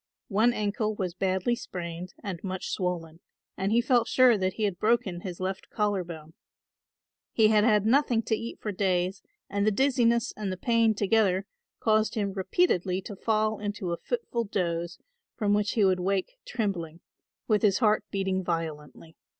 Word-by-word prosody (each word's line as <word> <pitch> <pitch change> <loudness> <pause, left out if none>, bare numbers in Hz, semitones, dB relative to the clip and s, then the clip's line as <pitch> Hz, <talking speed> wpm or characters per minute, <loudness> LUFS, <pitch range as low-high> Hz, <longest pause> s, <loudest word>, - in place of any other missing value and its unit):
One 220 +4 +3
ankle 215 -1 -1
was 185 -4 -3
badly 190 +5 0
sprained 175 -5 -7
and 185 -5 -5
much 190 -1 -4
swollen 170 -3 -3 0.4
and 195 +2 -1
he 235 +2 +4
felt 245 -2 +2
sure 255 -2 +5
that 190 -2 0
he 220 - -3
had 195 -4 -1
broken 215 -6 +1
his 180 -2 -6
left 190 +1 -4
collar 205 -3 0
bone. 160 -2 -10 1.0
He 220 -2 +5
had 210 -1 +4
had 210 -3 +3
nothing 240 -1 +3
to 220 - +1
eat 230 +2 -6
for 210 - -3
days 185 -1 0 0.3
and 200 0 -1
the 215 - +4
dizziness 235 -1 +2
and 205 -3 -3
the 185 - -4
pain 230 +1 +2
together 200 -2 +2 0.3
caused 215 -1 +2
him 200 -3 -1
repeatedly 190 - +1
to 205 - -7
fall 215 +1 0
into 205 -3 -3
a 170 - -1
fitful 350 - -3
doze 170 -3 -2 0.4
from 205 -3 +1
which 205 0 +1
he 215 -3 +3
would 185 -1 +3
wake 195 - -1
trembling, 175 -8 -3 0.5
with 210 -2 +3
his 200 -3 +3
heart 215 -3 +3
beating 190 -1 -1
violently. 160 -2 -5
200 Hz, 170 wpm, -28 LUFS, 185-220 Hz, 1.0 s, sure